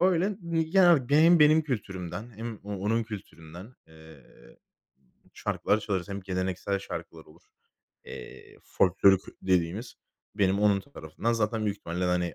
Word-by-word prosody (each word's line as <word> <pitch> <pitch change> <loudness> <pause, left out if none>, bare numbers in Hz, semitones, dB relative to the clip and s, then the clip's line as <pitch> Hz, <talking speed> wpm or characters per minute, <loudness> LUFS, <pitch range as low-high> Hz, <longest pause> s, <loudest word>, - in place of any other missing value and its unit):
öyle. 185 +1 +3
Mi 165 -1 0
ya, 185 0 +5
hani, 135 -7 +3
benim 165 +4 +6
benim 155 +1 +6
kültürümden 105 - -5
hem 115 0 -6
o 105 - -6
onun 110 +4 0
kültüründen, 95 0 -10
eee, 80 -3 -16 1.1
şarkılar 105 - 0
çalarız. 95 -3 -3
Hem 100 0 -5
geleneksel 95 +1 -2
şarkılar 85 -4 -8
olur. 85 +3 -20 0.6
Eee, - - -11
folklorik 95 +1 +3 0.2
dediğimiz. 95 +5 0 0.4
Benim 100 -1 +2
onun 100 -2 +3
tarafında 115 -2 -4
zaten 110 0 -1
büyük 100 0 -2
ihtimalle, 85 +2 -4
hani, 90 -1 0
100 Hz, 135 wpm, -28 LUFS, 90-120 Hz, 1.1 s, benim